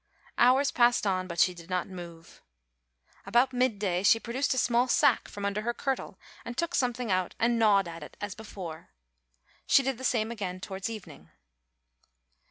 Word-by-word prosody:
Hours 260 +3 +5
passed 240 -2 +3
on, 185 -2 0
but 170 -1 -6
she 180 - +4
did 170 0 -13
not 180 -1 -1
move. 170 -3 -11 0.8
About 240 +6 +2
mid 250 -3 +1
day 185 -3 -1
she 215 +3 +5
produced 250 +5 -2
a - - -4
small 245 0 +2
sack - - +3
from 200 0 -6
under 200 +1 -1
her 240 +2 -2
kirtle 265 -8 -3 0.3
and 240 +1 -7
took 340 +1 -1
something 245 - 0
out 185 -1 0
and 235 0 +1
gnawed 200 -4 +4
at 165 0 -8
it - - -11
as 205 -1 -4
before. 180 -7 -9 0.8
She 275 - +5
did 265 -2 -2
the - - -8
same 230 -3 0
again 190 -5 -5
towards 190 +2 -5
evening. 220 -4 -10
215 Hz, 180 wpm, -28 LUFS, 185-245 Hz, 0.8 s, Hours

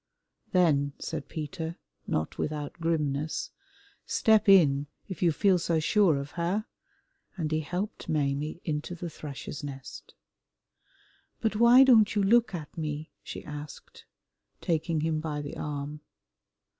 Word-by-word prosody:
"Then," 145 -6 +3
said 155 -4 -5
Peter, 160 +2 -5 0.3
not 80 - -2
without 150 -1 -3
grimness, 155 -2 -1 0.5
"step 220 -1 +3
in, 145 -7 +6 0.2
if 190 -6 -7
you 175 -2 +4
feel 185 +3 +3
so 165 -1 +1
sure 170 -1 +3
of 140 +1 -5
her," 180 +6 -1 0.7
and 160 -3 -2
he 155 - +2
helped 180 +6 -4
Maimie 150 +1 -1
into 155 +2 -3
the 170 -1 -6
Thrush's 145 -1 -7
Nest. 135 -3 -8 1.2
"But 220 -1 0
why 235 +4 +8
don't 220 -6 +5
you 205 - +2
look 220 0 +4
at 155 -4 -8
me?" 155 -1 -4
she - - -8
asked, 150 0 -9 0.5
taking 160 -1 0
him 160 0 0
by 155 -2 -3
the 145 -1 -6
arm. 150 0 -4
160 Hz, 130 wpm, -28 LUFS, 150-180 Hz, 1.2 s, why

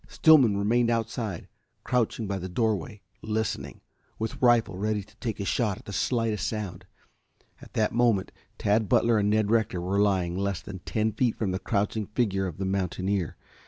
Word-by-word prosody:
Stillman 135 -11 +5
remained 115 +4 +2
outside, 115 -5 -2 0.4
crouching 120 -2 0
by 100 -1 -2
the 95 +1 -5
doorway 105 -1 -1 0.2
listening, 110 0 -3 0.4
with 110 0 -4
rifle 120 -5 +4
ready 105 +2 -1
to 110 - -22
take 110 -3 -4
a 100 - -2
shot 105 -2 0
at 115 - -15
the 100 - -7
slightest 115 -1 0
sound. 95 -4 -5 0.7
At - - -14
that 110 -1 +1
moment 115 -5 +2 0.3
Tad 105 0 +1
Butler 115 -2 +4
and 100 0 +2
Ned 105 0 +2
Rector 110 -5 +1
were 95 +3 -1
lying 95 -4 +2
less 100 -2 -1
than 95 0 -8
ten 110 0 0
feet 115 +2 0
from 105 -4 -1
the 95 - -2
crouching 105 0 -1
figure 100 -4 0
of 85 - -7
the 95 - -2
mountaineer. 95 -1 -1
105 Hz, 175 wpm, -27 LUFS, 95-115 Hz, 0.7 s, Stillman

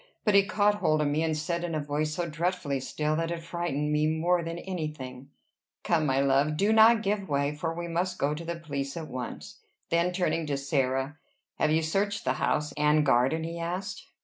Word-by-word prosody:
But 210 - +3
he 200 - +8
caught 205 0 +2
hold 155 -5 +2
of 150 - +2
me, 150 +2 0
and 160 -1 0
said, 170 +3 -2
in 170 -2 -2
a - - 0
voice 150 +1 -2
so 175 -1 -2
dreadfully 160 -3 -1
still 150 +4 -1
that 165 0 -1
it 170 -1 -4
frightened 165 -4 -2
me 150 +1 +2
more 170 +3 +2
than 165 +1 -4
any 175 -3 -3
thing, 130 -2 -9 0.5
"Come, 160 -3 +2
my 135 0 +2
love; 140 +2 +2
do 205 +5 +3
not 220 0 +6
give 200 -2 -1
way, 140 0 +1
for 160 +2 -3
we 170 +1 -5
must 175 +2 -1
go 145 +1 +1
to 155 +3 -6
the 170 +1 -3
police 140 -3 -4
at 160 -2 -5
once." 125 -1 -7 0.3
Then, 170 +2 +2
turning 175 -3 0
to 140 -1 -1
Sarah, 135 +1 -1 0.4
"Have 155 - +3
you 160 +1 +2
searched 200 +6 -1
the 130 - +2
house 150 -1 +1
and 150 0 +3
garden?" 135 +5 +3
he 165 +1 -5
asked. 190 +10 -4
160 Hz, 215 wpm, -28 LUFS, 145-175 Hz, 0.5 s, he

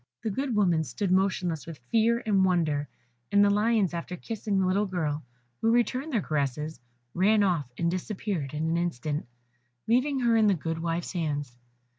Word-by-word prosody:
The 220 - -1
good 260 +3 -2
woman 175 -6 +3
stood 155 - -2
motionless 185 -4 +1
with 165 -2 -7
fear 230 +1 +3
and 200 -3 +3
wonder, 160 -6 +1 0.4
and 205 0 +6
the 200 - +4
lions, 210 -3 +2
after 170 +1 -4
kissing 215 -2 -3
the 190 - +2
little 200 +3 +1
girl, 155 -5 -2 0.4
who 225 - +3
returned 255 +5 +1
their 225 - +1
caresses, 150 0 -2 0.3
ran 205 +3 +4
off, 165 -10 0
and 170 0 +1
disappeared 185 -6 -3
in 155 +2 -1
an 165 +1 +1
instant, 155 -4 -2 0.6
leaving 260 +4 +2
her 235 -2 +3
in 220 -1 +5
the 200 - +4
good 165 0 -3
wife's 165 +2 -2
hands. 145 -7 -2
185 Hz, 175 wpm, -28 LUFS, 160-215 Hz, 0.6 s, and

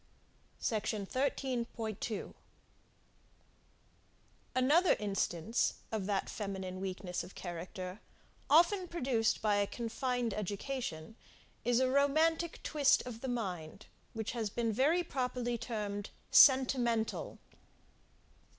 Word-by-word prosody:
SECTION 215 -2 -1
13.2. 235 -4 -2 2.2
Another 295 +8 +5
instance 205 +1 0 0.2
of 210 -4 -2
that 200 -2 0
feminine 190 -3 -5
weakness 185 -2 -3
of 180 - -12
character, 180 +2 -6 0.5
often 350 +5 +5
produced 250 -12 0
by 210 -1 +3
a 200 0 +2
confined 240 0 -2
education, 210 -3 -4 0.5
is 240 +1 +3
a 260 - +3
romantic 315 +5 +2
twist 295 -3 +3
of 235 -2 -7
the 265 - -4
mind, 190 -7 -4 0.3
which 220 -1 -3
has 230 -3 -2
been 230 +1 -1
very 300 +10 +3
properly 250 -5 -2
termed 210 -3 -4 0.2
SENTIMENTAL. 250 -4 +4
230 Hz, 95 wpm, -33 LUFS, 200-260 Hz, 2.2 s, Another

